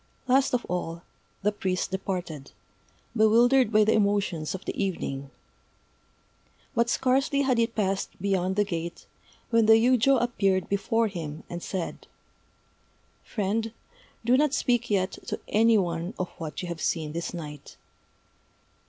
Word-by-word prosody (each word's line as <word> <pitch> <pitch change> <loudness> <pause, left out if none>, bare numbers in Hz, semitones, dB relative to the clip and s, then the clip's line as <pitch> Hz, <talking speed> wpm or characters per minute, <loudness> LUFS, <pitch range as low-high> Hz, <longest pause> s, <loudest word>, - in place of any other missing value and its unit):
Last 265 0 +3
of 240 - -2
all, 170 -1 -4 0.4
the 210 - +3
priest 190 -2 -2
departed, 180 -7 -4 0.6
bewildered 235 +2 +5
by 215 0 +5
the 215 - +3
emotions 200 -6 +1
of 190 - -9
the - - -3
evening. 140 -7 -3 1.4
But 235 -1 +2
scarcely 270 +3 +2
had 255 -3 +2
he 230 - +3
passed 195 -4 -2
beyond 190 -1 0
the 205 - +3
gate, 170 -3 -5 0.5
when 230 -2 +4
the 220 - +8
yujô 250 +3 +4
appeared 195 -6 +1
before 220 +3 +1
him, 160 -5 -6
and 175 0 -5
said: 185 -2 -5 1.2
"Friend, 220 +1 -2 0.5
do 245 +2 +5
not 295 -1 +2
speak 240 -2 +1
yet 195 -2 0
to - - -3
any 225 +1 +4
one 175 +2 -2
of 180 -1 -2
what 160 +2 -5
you - - -4
have 170 -2 -5
seen 155 -3 -1
this 170 +2 -4
night." 150 -4 -8
200 Hz, 140 wpm, -27 LUFS, 175-230 Hz, 1.4 s, the